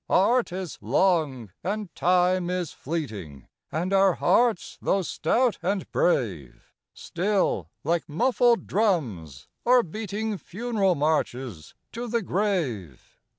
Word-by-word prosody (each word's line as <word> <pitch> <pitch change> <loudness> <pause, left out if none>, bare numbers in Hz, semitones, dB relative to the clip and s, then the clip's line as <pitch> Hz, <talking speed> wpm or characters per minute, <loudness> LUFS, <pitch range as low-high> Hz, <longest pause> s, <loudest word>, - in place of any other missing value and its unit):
Art 235 +4 +3
is 185 -2 -5
long, 150 - +1
and 200 0 -3
Time 180 0 +2
is 180 -3 -2
fleeting, 105 - -6 0.2
And 175 +5 -1
our 195 -2 +4
hearts, 235 -6 +1
though 195 -1 +1
stout 230 +9 +1
and 195 -2 -2
brave, 95 - -1 0.2
Still, 180 - -1
like 165 +2 -1
muffled 240 - +2
drums, 115 - -1 0.2
are 245 0 +5
beating 210 +2 -4
Funeral 200 -2 0
marches 130 - -2 0.2
to 240 +2 -5
the 235 -1 -1
grave. 160 - -2
180 Hz, 110 wpm, -26 LUFS, 140-210 Hz, 0.2 s, are